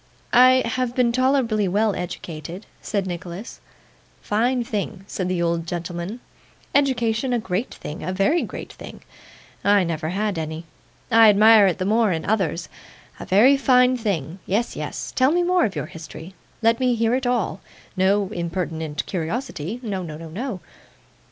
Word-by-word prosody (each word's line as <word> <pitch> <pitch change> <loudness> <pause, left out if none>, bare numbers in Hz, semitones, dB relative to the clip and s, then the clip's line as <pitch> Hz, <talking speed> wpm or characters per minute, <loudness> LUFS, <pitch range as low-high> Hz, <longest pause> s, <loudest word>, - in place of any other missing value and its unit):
'I 255 +1 +6
have 245 +1 -2
been 245 -2 +3
tolerably 250 -5 +2
well 205 +3 +1
educated,' 170 0 -6 0.2
said 200 -3 -2
Nicholas. 180 +3 -7 0.6
'Fine 240 +4 +1
thing,' 200 -3 -4
said 185 -2 -3
the 180 -2 0
old 170 0 -1
gentleman, 175 +6 -5 0.5
'education 250 -3 +1
a - - +2
great 215 +1 -3
thing: 150 - -7
a 185 - -2
very 200 - +2
great - - -7
thing! - - -11 0.6
I 200 -1 +4
never 160 -2 -2
had 200 0 -1
any. 160 +1 -5 0.5
I 225 -1 +8
admire 210 0 +7
it 180 - 0
the 185 - -2
more 220 0 +3
in 160 -2 -2
others. 180 -6 0 0.5
A - - -7
very 230 +9 +6
fine 255 -2 +4
thing. 190 - -3
Yes, 220 +5 0
yes. - - -5
Tell 260 +2 +4
me 350 +2 +2
more 360 0 +3
of 200 - -3
your - - -3
history. 165 +2 -10 0.3
Let 230 +1 +3
me 250 -2 +2
hear 230 +1 +1
it 255 0 0
all. 235 -5 -1 0.3
No 195 +1 +2
impertinent 165 -3 -3
curiosity 190 - -4
no, 200 -5 -3
no, 155 -4 -7
no. 185 - -6
205 Hz, 160 wpm, -23 LUFS, 175-240 Hz, 0.6 s, I